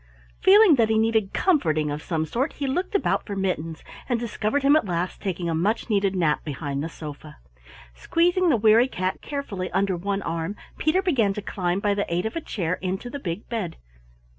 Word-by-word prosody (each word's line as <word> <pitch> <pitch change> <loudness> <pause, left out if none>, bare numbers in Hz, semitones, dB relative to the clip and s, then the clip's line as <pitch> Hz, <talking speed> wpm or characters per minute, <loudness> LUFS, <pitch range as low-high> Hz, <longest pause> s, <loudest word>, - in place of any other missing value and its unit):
Feeling 390 -5 +7
that 225 -2 +3
he 220 - +3
needed 220 -2 +2
comforting 155 - +1
of 145 +1 -4
some 160 -1 -2
sort, 250 - -2
he 280 - -4
looked 355 +10 -2
about - - +1
for 200 - -4
Mittens 165 -4 -2 0.3
and 240 -2 +1
discovered 235 +3 -1
him 280 +2 +6
at 310 - +2
last, 175 0 -2
taking 180 -3 -3
a 165 - 0
much 205 +8 0
needed 195 -2 +2
nap 165 -5 +1
behind 140 -1 -4
the 165 - -3
sofa. 150 -1 -9 0.6
Squeezing 350 - +2
the 265 - +4
weary 225 +3 +5
cat 185 -6 -3
carefully 220 -11 -4
under 195 0 +1
one 195 +2 -2
arm, 165 +4 -3 0.2
Peter 345 +5 +2
began 240 - +2
to 210 - -4
climb 180 -2 -1
by 205 -1 +2
the 200 -3 -2
aid 175 +3 0
of 220 - -3
a 330 - -2
chair 180 - -2
into 190 +6 -3
the 285 - -5
big 175 -3 -5
bed. 215 -8 -4
200 Hz, 200 wpm, -24 LUFS, 170-245 Hz, 0.6 s, Feeling